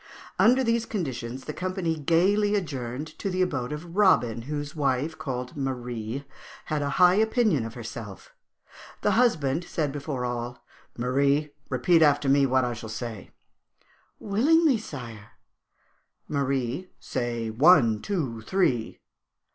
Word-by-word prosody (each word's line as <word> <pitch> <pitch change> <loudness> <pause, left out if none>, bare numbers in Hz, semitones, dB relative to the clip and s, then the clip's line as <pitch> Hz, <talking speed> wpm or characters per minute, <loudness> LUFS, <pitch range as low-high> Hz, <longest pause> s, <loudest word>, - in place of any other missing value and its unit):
Under 255 +3 +5
these 230 -1 +1
conditions 130 - -4
the 150 - -6
company 185 -2 -2
gaily 190 +7 +2
adjourned 140 -7 -3
to 195 - -2
the 185 0 +1
abode 140 -8 -2
of 165 +3 -7
Robin, 125 - +3
whose 145 +3 -5
wife, 140 +2 0
called 125 -5 -5
Marie, 125 -2 -4 0.4
had 155 -1 -1
a 140 - -1
high 180 0 +7
opinion 215 - +2
of 115 - -8
herself. 115 -4 -8 0.7
The - - +2
husband 170 - +2
said 155 -4 -2
before 140 -3 -4
all, 120 0 -5 0.3
'Marie, 140 +4 +1 0.2
repeat 135 +7 +3
after 145 -2 +4
me 140 0 +4
what 130 0 +2
I 120 - -2
shall 110 -1 -8
say.' 110 -3 -6 0.9
'Willingly, 275 +6 +3
sire.' 115 - -9 0.9
'Marie, 140 +3 -1
say, 120 -2 -3
"One, 115 -4 +5
two, 135 - -3
three!"' 130 - 0
140 Hz, 130 wpm, -26 LUFS, 120-180 Hz, 0.9 s, high